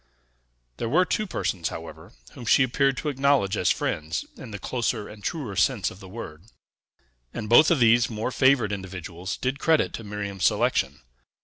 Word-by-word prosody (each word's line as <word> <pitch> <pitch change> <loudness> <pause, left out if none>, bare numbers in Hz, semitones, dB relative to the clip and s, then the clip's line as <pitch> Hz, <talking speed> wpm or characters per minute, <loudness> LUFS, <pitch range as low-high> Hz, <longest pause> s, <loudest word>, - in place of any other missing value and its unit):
There 115 - -3
were 180 +8 +4
two 215 +2 -1
persons, 90 - -2
however, 80 0 -9 0.2
whom 125 - -10
she 130 - +5
appeared 135 +1 +1
to 150 - -2
acknowledge 135 -7 +2
as 90 - +1
friends 80 +3 -1
in 125 - -10
the 105 - -6
closer 115 0 -2
and 105 -1 -12
truer 135 - -3
sense 105 - +1
of 95 - -13
the 95 -2 -12
word; 90 -6 -9 0.9
and 110 - -4
both 120 +8 +7
of 170 - +3
these 120 0 +5
more 110 +2 -3
favored 130 -5 +3
individuals 95 -2 -6
did 130 +2 -2
credit 160 -1 +2
to 115 - -6
Miriam's 100 -2 -4
selection. 70 +3 +1
110 Hz, 175 wpm, -25 LUFS, 95-130 Hz, 0.9 s, both